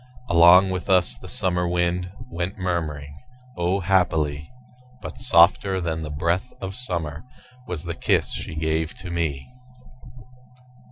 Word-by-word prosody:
Along 85 +3 +7
with 90 +2 -4
us 90 -2 +3
the - - -13
summer 90 -1 0
wind 90 +1 -1 0.2
Went 90 0 -4
murmuring 80 -6 -3 0.4
O, 90 +3 0
happily! 80 -5 0 0.5
But - - -9
softer 95 -3 +4
than 80 -2 -3
the 80 - -5
breath 85 +10 -1
of 95 0 -5
summer 85 - -3 0.4
Was 85 -3 -4
the 85 -1 -4
kiss - - 0
she - - -6
gave 80 +1 -1
to 90 - -8
me. 80 -5 -2
85 Hz, 130 wpm, -23 LUFS, 80-90 Hz, 0.5 s, Along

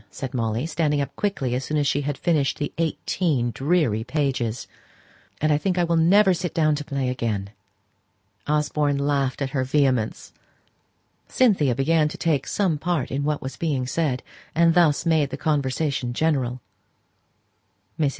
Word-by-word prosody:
said 130 +3 -6
Molly, 115 +1 -1
standing 155 -2 0
up 140 - -3
quickly 165 -12 -1
as 125 +2 -1
soon 150 - -2
as 145 - +1
she 140 +1 +1
had 145 -1 -3
finished 155 -6 +1
the 145 - -3
eighteen 155 -5 0
dreary 135 -6 +1
pages; 125 -4 -2 0.7
"and 155 0 +2
I 145 - +2
think 185 +2 -1
I 175 - +3
will 170 0 +1
never 190 +4 +5
sit 175 0 -4
down 155 -2 +3
to 150 - -4
play 140 -4 -2
again!" 110 -6 -2 1.0
Osborne 150 -1 +1
laughed 140 -1 0
at 135 - -3
her 130 -2 0
vehemence. 130 -4 0 0.9
Cynthia 185 - +2
began 150 +4 +2
to 150 - -6
take 155 -5 0
some 180 -7 0
part 170 -5 -1
in 140 +1 -1
what 150 0 -1
was 130 - -6
being 145 -6 -1
said, 130 -2 -1 0.3
and 165 0 +4
thus 165 -4 +3
made 160 -4 +2
the 135 - -5
conversation 140 -3 -1
general. 130 -4 0 1.4
Mrs. 150 -3 +3
145 Hz, 160 wpm, -23 LUFS, 130-160 Hz, 1.4 s, never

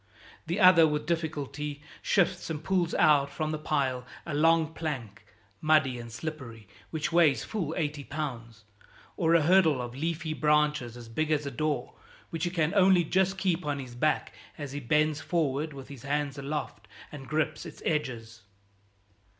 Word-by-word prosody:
The 170 +4 -1
other 180 -3 +8
with 150 -1 -2
difficulty 150 -3 -3 0.2
shifts 180 -3 +1
and 155 -1 -4
pulls 180 -2 0
out 145 -2 +4
from 155 -1 -3
the 155 - -3
pile 135 -5 -1 0.2
a 155 - -4
long 160 +1 +3
plank, 135 -11 -5 0.4
muddy 155 -5 +3
and 115 -1 -8
slippery, 115 -6 -7 0.2
which 160 0 -2
weighs 165 -5 +4
full 170 -8 -3
eighty 150 -3 -2
pounds, 120 -7 -6 0.5
or 165 -1 +3
a 165 - +4
hurdle 165 -4 +4
of 120 -1 -5
leafy 160 +2 -2
branches 150 -5 +1
as 120 -1 -10
big 155 +7 -2
as 150 -2 +1
a 140 - -3
door, 145 -1 -2 0.4
which 165 +1 -2
he - - 0
can 165 -2 0
only 190 -3 +5
just 190 +3 +1
keep 180 -4 0
on 145 -1 -2
his 130 -3 -7
back 150 +5 0 0.2
as 145 -3 -6
he 145 - -4
bends 150 +3 +1
forward 155 -2 -1
with 135 -2 -10
his 140 -4 -10
hands 145 +1 -1
aloft 145 +2 -5 0.2
and 135 -3 -9
grips 155 0 -1
its - - -11
edges. 120 -7 -2
150 Hz, 165 wpm, -29 LUFS, 140-165 Hz, 0.5 s, other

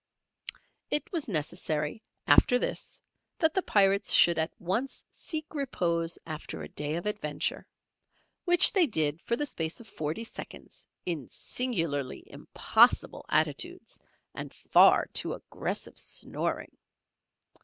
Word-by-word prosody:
It 295 - -1
was 330 -7 -3
necessary 155 +1 -1 0.2
after 245 - +5
this, - - -4 0.4
that 320 -2 +2
the 380 - +1
Pirates 200 - +3
should 170 -2 +6
at 160 +1 0
once 210 +10 -3
seek 310 -2 -4
repose 170 - -1
after 155 -1 -7
a - - -8
day 150 +1 -3
of 170 - -4
adventure, 150 -9 -3 0.8
which 350 -1 +7
they 365 -5 +4
did 155 - 0
for 235 - -1
the 295 - -2
space 160 - -3
of 235 - -13
forty 160 +3 -4
seconds 230 - -9 0.2
in 160 -8 -3
singularly 165 - -2
impossible - - +2
attitudes - - -1 0.3
and - - -7
far - - +5
too - - +1
aggressive - - -5
snoring. - - -3
180 Hz, 120 wpm, -29 LUFS, 155-255 Hz, 0.8 s, which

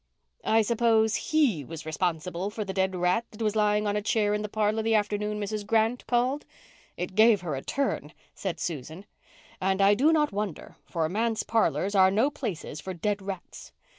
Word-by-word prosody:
"I 220 0 +4
suppose 220 -1 +2
he 270 - +1
was 160 +2 -8
responsible 175 +3 -2
for 210 0 -5
the 190 - -4
dead 190 -1 0
rat 180 +5 +1
that 215 - -12
was 215 0 0
lying 210 0 +2
on 205 0 0
a 210 - 0
chair 210 -1 +1
in 210 - -1
the 210 - -4
parlour 215 +1 0
the 225 0 +2
afternoon 210 0 0
Mrs. 210 0 -3
Grant 225 +3 +1
called. 250 +4 +1 0.5
It 180 +2 -4
gave 215 -1 +5
her 170 -4 -3
a 135 - -3
turn," 265 - -2 0.2
said 190 -4 -4
Susan, 160 +4 -5 0.6
"and 190 +1 +1
I 200 +1 +6
do 280 +9 +4
not 300 -2 +2
wonder, 200 -4 -4
for 165 -3 -1
manse 220 +5 -1
parlours 215 -3 +1
are 190 -2 +6
no 225 +9 +2
places 195 - -5
for 185 +2 -6
dead 205 +4 -1
rats. 190 -2 -8
210 Hz, 190 wpm, -27 LUFS, 185-220 Hz, 0.6 s, I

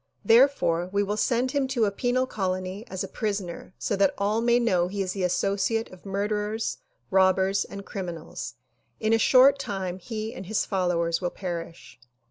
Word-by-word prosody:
Therefore 225 -8 +4
we 200 +1 +2
will 205 +1 -2
send 245 +3 +1
him 280 -1 0
to 250 -4 +1
a 200 - 0
penal 245 +4 0
colony 185 -2 -3
as 190 +1 -4
a - - -4
prisoner 195 -5 -4
so 205 - -1
that 195 -1 +2
all 210 +3 +1
may 235 0 +4
know 185 -7 +2
he 195 +1 -2
is 185 - -3
the 195 - -4
associate 200 +5 0
of 185 +1 -13
murderers, 210 +2 -2 0.3
robbers 190 +1 +3
and 200 0 -9
crimi 180 -4 -5
nals; 155 -6 -7 0.4
in 220 +1 +1
a 225 - +4
short 265 +4 +6
time 190 -7 -4
he 220 +3 -5
and 185 - -8
his 215 +1 0
followers 175 -3 0
will 175 - 0
perish." 170 - -7
200 Hz, 180 wpm, -26 LUFS, 185-225 Hz, 0.4 s, short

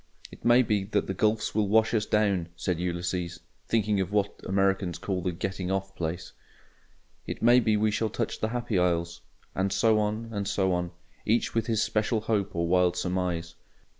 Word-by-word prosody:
"It - - -14
may 120 +2 +6
be 105 -4 0
that 100 0 0
the 95 - -3
gulfs 110 +3 0
will 105 -2 +1
wash 110 +3 +3
us 105 -2 +1
down," 100 -5 +1
said 85 0 -2
Ulysses 90 0 -3 0.3
(thinking 105 -3 +1
of 95 - -3
what 105 -1 -1
Americans 95 -2 +1
call 95 -2 -3
the 90 +1 -1
"getting 90 +1 -4
off 95 0 -2
place"); 85 +1 -4 0.9
"it - - -5
may 120 +2 +7
be 110 -3 +2
we 110 0 +2
shall 110 +1 0
touch 115 +2 -3
the 110 - 0
Happy 120 -4 -1
Isles." 85 -1 0 0.3
And 95 +1 0
so 110 +1 +3
on, 110 +2 -2
and 100 -2 -3
so 95 -2 +1
on; 90 0 -1 0.3
each 115 +2 +1
with 115 - 0
his 110 -2 +1
special 110 +1 0
hope 100 -3 -1
or 85 0 0
"wild 90 0 +3
surmise." 90 -2 -2
100 Hz, 190 wpm, -27 LUFS, 90-110 Hz, 0.9 s, may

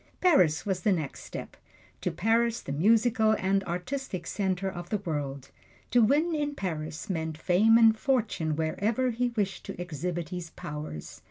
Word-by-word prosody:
Paris 180 - +4
was 190 -3 0
the 205 +3 +2
next 160 -7 -2
step - - -8 0.5
to - - 0
Paris, 230 +3 +1
the - - -6
musical 220 - +3
and 195 +1 +1
artistic 180 +1 -4
center 190 -1 -1
of 175 -2 -6
the 210 - +1
world. 145 -7 -4 0.4
To 245 - +5
win 295 +9 +3
in 295 -2 -1
Paris 160 - -4
meant 160 -5 -3
fame 200 +7 +4
and 225 -1 +6
fortune 215 - 0
wherever 215 +11 0
he 245 +2 0
wished 205 -5 -2
to - - -7
exhibit 175 0 -3
his 180 -2 -5
powers. 150 - -7
190 Hz, 160 wpm, -28 LUFS, 160-230 Hz, 0.5 s, and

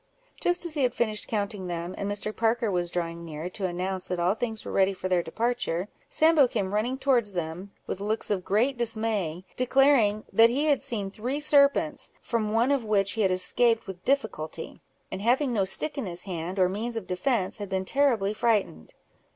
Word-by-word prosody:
Just 355 0 +2
as 335 - 0
he 300 - -1
had 250 -2 +1
finished 215 -3 0
counting 205 -3 -3
them, 175 +1 -4
and 200 0 -3
Mr. 210 +1 -3
Parker 230 -1 +1
was 175 -2 -1
drawing 170 -1 -3
near, 160 +2 -6
to 190 0 -2
announce 185 +1 -3
that 180 -1 -3
all 175 +2 +2
things 225 -1 -4
were - - -5
ready 195 0 +3
for 185 - -4
their 180 -1 +2
departure, 210 -1 -2 0.2
Sambo 315 -4 +4
came 200 -5 -2
running 235 +5 0
towards 250 -7 +1
them, 175 +2 -4 0.2
with - - -4
looks 215 +2 -2
of 190 -3 0
great 240 +7 +1
dismay, 215 -7 0
declaring 255 -5 +3
"that 225 +1 +7
he 270 +5 0
had 290 -3 +2
seen 205 -4 -4
three 250 +8 -3
serpents, 285 -1 +3
from 220 -3 -2
one 235 +5 +2
of 275 -4 +1
which 205 -2 +2
he 225 - -2
had 195 - +3
escaped 225 +5 +2
with 185 -2 -9
difficulty; 220 - -2 0.3
and 190 - -5
having 250 +4 +2
no 200 -4 +1
stick 290 +10 0
in 235 - -3
his 175 0 -5
hand, 180 0 -5
or 185 -1 +4
means 220 +6 -3
of 225 -4 -4
defence, 185 +3 -1
had 205 -2 -6
been 190 0 -2
terribly 235 -6 +2
frightened." 210 - -1
210 Hz, 200 wpm, -27 LUFS, 185-240 Hz, 0.3 s, that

